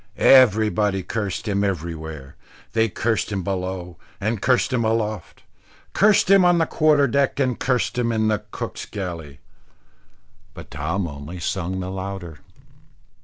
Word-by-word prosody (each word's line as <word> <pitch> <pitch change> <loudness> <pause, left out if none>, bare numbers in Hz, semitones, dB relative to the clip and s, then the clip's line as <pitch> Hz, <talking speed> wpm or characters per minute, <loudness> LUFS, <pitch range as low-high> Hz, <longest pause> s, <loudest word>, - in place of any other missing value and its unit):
Everybody 105 -5 +4
cursed 105 +1 -4
him 100 -1 0
everywhere; 80 -6 -4 0.4
they 115 0 +2
cursed 110 +3 -1
him 95 -2 -2
below 90 -2 -4 0.2
and 110 0 -2
cursed 130 +1 +2
him 120 -2 +1
aloft; 110 -1 -2 0.5
cursed 210 0 +4
him 195 -1 +7
on 175 -1 +4
the 165 - +3
quarter 155 -3 +3
deck, 140 +2 0
and 130 -3 0
cursed 125 -1 0
him 115 -1 +1
in 110 -1 +1
the 105 -1 0
cook's - - -6
galley. 85 -9 -7 1.1
But - - -11
Tom 85 +6 -2
only 75 +4 -8
sung 95 +1 -3
the 90 0 -5
louder. 95 -5 -6
100 Hz, 140 wpm, -22 LUFS, 90-115 Hz, 1.1 s, him